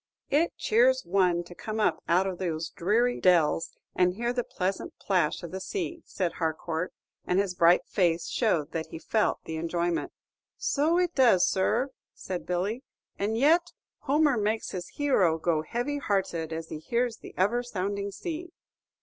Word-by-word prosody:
"It 310 +5 +2
cheers - - +3
one 180 -3 +2
to 175 - -12
come 215 +4 -5
up 210 - +1
out 180 +3 +4
of 185 -2 -3
those 165 -3 -2
dreary 230 +7 +1
dells, 165 -3 +3 0.2
and 180 0 +2
hear 240 +3 -1
the 245 -1 -1
pleasant 190 -2 -3
plash 180 -6 0
of 170 - -6
the 190 +1 -5
sea," 345 - -4
said 180 -3 -1
Harcourt; 160 +1 -2 0.4
and 180 - +2
his 195 -2 +1
bright 175 0 +4
face 175 -4 +1
showed 170 - 0
that 160 -1 -3
he - - -8
felt 215 +6 +1
the 160 - -5
enjoyment. 170 +1 -1 0.5
"So 310 +4 +1
it 355 -1 +1
does, 235 -10 +5
sir," 240 +8 +1 0.2
said 185 -2 -5
Billy. 190 +7 -1 0.4
"And 215 +3 0
yet 335 +7 +3 0.3
Homer 290 -2 +2
makes 215 +1 -1
his 180 -2 -5
hero 205 - +2
go 160 -1 +1
heavy 245 - -2
hearted 190 - -1
as 160 0 -5
he 155 - -5
hears 235 +6 -1
the - - -12
ever 210 +6 +2
sounding 200 -3 -3
sea." 335 - -6
195 Hz, 165 wpm, -28 LUFS, 175-245 Hz, 0.5 s, does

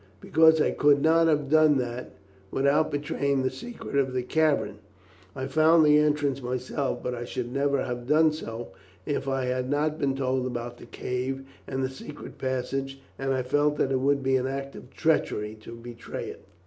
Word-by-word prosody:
"Because 160 0 +5
I - - +3
could 145 -1 +4
not 165 +2 +4
have 150 -3 +2
done 155 0 +5
that 125 0 -4 0.4
without 140 +6 +2
betraying 140 -1 -1
the 130 - 0
secret 240 -9 -8
of 135 -2 +1
the 125 -1 -1
cavern. 150 -7 +1 0.6
I 130 - -3
found 155 +3 +5
the 150 0 +6
entrance 145 -2 +1
myself, 130 +2 -3
but 125 - -2
I 120 -1 -4
should 120 0 -4
never 140 0 +1
have 120 -1 -5
done 155 +2 +5
so, 115 -8 -6 0.4
if 145 -2 -2
I 135 -1 0
had 125 0 -1
not 150 +2 0
been 135 -1 +1
told 130 -1 0
about 120 -1 -5
the - - -12
cave 130 +3 -3 0.2
and 130 0 -2
the - - +1
secret 140 +3 -10
passage, 135 +1 -2 0.2
and 135 0 -1
I 130 -1 0
felt 145 +3 +2
that 135 - +1
it 130 - +2
would 140 +1 +1
be 135 0 +3
an 130 0 -1
act 135 +1 -5
of 125 - -11
treachery 110 -10 0
to 115 +2 -9
betray 115 0 -7
it." - - -11
135 Hz, 190 wpm, -27 LUFS, 125-150 Hz, 0.6 s, the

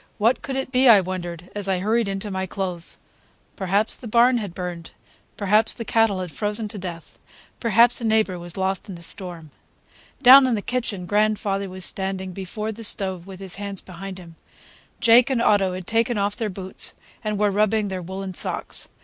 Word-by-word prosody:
What 230 +4 +2
could 270 -1 -4
it 265 -1 -3
be, 255 0 +5
I 215 -3 +9
wondered, 175 -2 -5
as 205 -1 -5
I 190 - +2
hurried 220 +4 +1
into 195 +1 -4
my 190 0 -2
clothes. 180 -3 -3 0.6
Perhaps 200 +3 0
the 245 - -9
barn 240 +2 +4
had 200 -6 -6
burned; 175 -2 -6 0.5
perhaps 215 +2 +2
the 230 - -6
cattle 225 -5 +2
had 180 -3 -6
frozen 210 +3 -2
to 205 - -7
death; 170 -3 -8 0.4
perhaps 235 +1 +4
a - - -5
neighbor 220 -5 +1
was 175 +1 -8
lost 190 +2 -2
in 190 - -6
the 170 - -8
storm. 170 -3 -2 0.7
Down 260 +1 +9
in 245 - +1
the 205 - -4
kitchen 225 -7 -2
grandfather 205 -1 0
was 185 0 -3
standing 190 -1 -2
before 195 +4 -5
the 225 +1 -9
stove 190 -4 -1
with 190 -1 -10
his 190 -2 -4
hands 200 -1 -5
behind 190 +1 -8
him. 170 -3 -13 0.6
Jake 235 +2 +6
and 260 -3 +1
Otto 200 -5 +3
had 185 -1 -7
taken 230 +2 +1
off 200 0 0
their 225 -4 -2
boots 190 0 -4 0.3
and 215 -1 -2
were 210 -1 +3
rubbing 210 +1 +1
their 190 -1 -4
woolen 190 +2 -6
socks. - - -2
200 Hz, 190 wpm, -23 LUFS, 185-220 Hz, 0.7 s, I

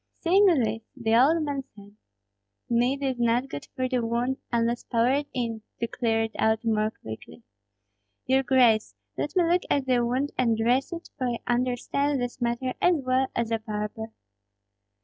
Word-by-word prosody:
Seeing 385 +4 +5
this, 225 - +2 0.2
the 225 -2 +1
old 305 +7 +4
man 285 -2 -3
said, 205 0 -15 0.7
"Mead 245 +4 +1
is 260 -2 -1
not 240 +3 +1
good 145 - -7
for 255 -1 0
the 250 -2 -1
wound, 240 +3 -1
unless 235 0 0
poured 255 +5 +1
in, 230 -3 -3 0.2
to 235 - 0
clear 225 -1 0
it 225 - -3
out 220 +1 +1
more 215 -1 +2
quickly. 110 - -11 0.8
Your 265 +1 +3
grace, 245 -5 +3 0.2
let 295 - -3
me 360 - +4
look 350 +2 +2
at 280 -2 +1
the 250 -2 +2
wound 255 +4 -1
and 230 -3 +2
dress 245 +6 +1
it, 340 0 -7
for 255 - 0
I 240 -1 -1
understand 255 +3 0
this 245 0 -4
matter 240 +2 -1
as 355 0 +4
well 260 -2 +1
as 235 -1 -1
a 225 - +1
barber." 215 +1 -4
245 Hz, 170 wpm, -26 LUFS, 230-265 Hz, 0.8 s, Seeing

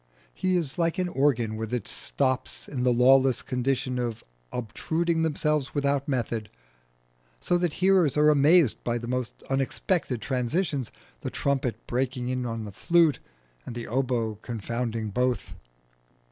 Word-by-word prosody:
He 185 - 0
is 160 -4 -1
like 165 -1 +1
an 185 -1 0
organ 125 -8 +1
with 110 0 -4
its 125 -5 0
stops 130 - 0
in 130 -4 -4
the 125 0 +3
lawless 130 +1 +4
condition 130 0 -1
of 120 -2 -3 0.3
obtruding 160 +8 -1
themselves 150 -3 0
without 140 -1 +1
method, 120 -5 -2 0.9
so 175 - 0
that 175 -3 0
hearers 185 -7 +3
are 150 0 +6
amazed 145 -4 +4
by 120 0 0
the 120 - -6
most 125 -1 -3
unexpected 135 - 0
transitions 135 - -1 0.3
the - - -4
trumpet 135 -4 -1
breaking 125 0 -2
in 125 -1 -1
on 115 -1 -4
the 105 - -7
flute, 165 - +3 0.4
and 115 - -8
the 120 - -5
oböe 120 -4 -1
confounding 115 -1 -3
both. 125 -5 -1
130 Hz, 145 wpm, -27 LUFS, 120-150 Hz, 0.9 s, are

